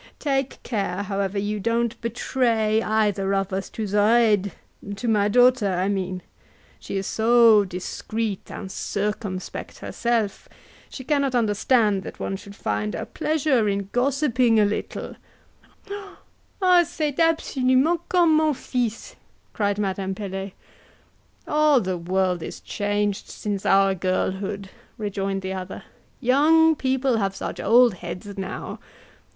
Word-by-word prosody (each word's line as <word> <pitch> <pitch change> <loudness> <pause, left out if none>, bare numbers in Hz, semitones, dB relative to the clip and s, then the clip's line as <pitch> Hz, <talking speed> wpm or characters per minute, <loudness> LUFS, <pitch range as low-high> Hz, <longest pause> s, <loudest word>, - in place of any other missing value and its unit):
Take 275 -2 -2
care, 200 -4 -2
however, 200 0 -2
you 205 +1 -1
don't 230 +2 -1
betray 230 -2 +1
either 205 -3 +1
of 195 0 -1
us 190 0 -3
to 220 - -4
Zoraide 210 -1 +3 0.4
to 240 +4 -5
my 210 -2 +3
daughter, 245 -2 +4
I 185 +2 0
mean; 185 -2 -2 0.6
she - - -5
is 195 - -2
so 225 -1 +5
discreet 200 +3 -4
and 190 -2 -7
circumspect 200 -2 -4
herself, 230 -4 -2 0.4
she 260 - -8
cannot 280 -2 +1
understand 215 -2 +2
that - - -9
one 195 - -3
should 200 +1 -11
find 105 - -2
a - - -4
pleasure 280 -8 +1
in 200 -1 -2
gossiping 250 -3 +2
a 210 - +5
little 205 - -4 0.8
" 400 0 -19 0.3
"C'est 300 -4 -2
absolument 315 -1 +2
comme 340 -4 +4
mon 310 -2 +2
fils!" 245 -3 -3 0.4
cried 205 -1 0
Madame 195 -1 -2
Pelet. 195 -1 -5 0.9
"All 300 -2 +4
the 185 -4 -2
world 180 0 0
is - - -6
so - - -15
changed 205 -1 -1
since 205 -2 -4
our 195 0 +4
girlhood!" 190 +2 -2 0.3
rejoined 195 -2 -3
the 190 0 -3
other: 185 0 -6 0.4
"young 310 +5 +4
people 260 -2 +1
have 195 -2 -1
such - - -5
old 235 +1 +5
heads 180 +3 -7
now. 195 -1 -6
210 Hz, 130 wpm, -24 LUFS, 195-250 Hz, 0.9 s, so